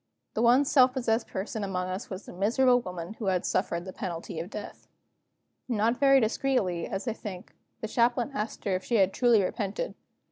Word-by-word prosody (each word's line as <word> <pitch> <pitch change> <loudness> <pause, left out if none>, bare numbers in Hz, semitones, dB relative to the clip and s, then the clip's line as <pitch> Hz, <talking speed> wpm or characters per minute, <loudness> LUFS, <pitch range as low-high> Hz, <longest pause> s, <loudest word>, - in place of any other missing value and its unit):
The 220 - -1
one 245 +4 +5
self 260 -2 +5
possessed 235 -3 0
person 205 +2 -4
among 185 -2 -2
us 185 +3 -5
was 190 +1 -7
the - - -10
miserable 245 +7 +3
woman 180 -1 -6
who 215 - -3 0.2
suffered 170 +1 -1
the 185 - -7
penalty 165 -2 -5
of 170 +3 -5
death. 210 -1 -8 0.8
Not 230 0 +1
very 275 -1 +6
discreetly, 220 -7 0
as 195 +6 -4
I 230 - 0
think, 190 -5 -8 0.3
the 220 - -2
Chaplain 240 +3 +1
asked 215 -4 -4
her 200 - 0
if 185 - -3
she 240 - -1
had 195 -3 +3
truly 235 -5 +4
repented. 200 - -3
215 Hz, 185 wpm, -28 LUFS, 185-245 Hz, 0.8 s, very